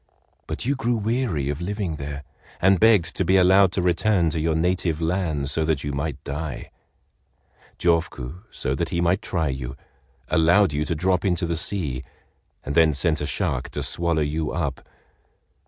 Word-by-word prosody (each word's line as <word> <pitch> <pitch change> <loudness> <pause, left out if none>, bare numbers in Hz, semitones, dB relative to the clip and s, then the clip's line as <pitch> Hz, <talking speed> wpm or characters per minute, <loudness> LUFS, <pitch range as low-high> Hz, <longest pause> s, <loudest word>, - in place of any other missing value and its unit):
But - - -3
you 140 +3 +1
grew 120 -3 0
weary 110 - -1
of 75 +3 -3
living 95 -3 -3
there, 70 0 -6 0.4
and 95 0 +4
begged 110 -6 +4
to - - +1
be 95 +2 +3
allowed 95 0 +5
to 90 - 0
return 90 -1 +2
to 80 - -2
your 80 0 +1
native 85 -1 0
land 80 -5 -1
so 80 - 0
that 75 -3 0
you 75 - -3
might 70 -1 -3
die. 75 -1 -5 1.1
Jofuku, 85 -3 -1
so 65 - -2
that 85 +5 -2
he 85 - -1
might 85 +3 +2
try 80 -5 -1
you, 65 -1 -5 0.5
allowed 85 +2 +4
you 75 +1 -1
to 85 - -1
drop 90 +2 +1
into 90 -3 +1
the 85 0 -1
sea, 75 -7 -2 0.6
and 70 - -4
then 80 -1 +4
sent 80 +1 +1
a 75 - -2
shark - - -1
to - - -4
swallow 85 -2 0
you 75 +1 -2
up. - - -2
85 Hz, 175 wpm, -24 LUFS, 75-95 Hz, 1.1 s, allowed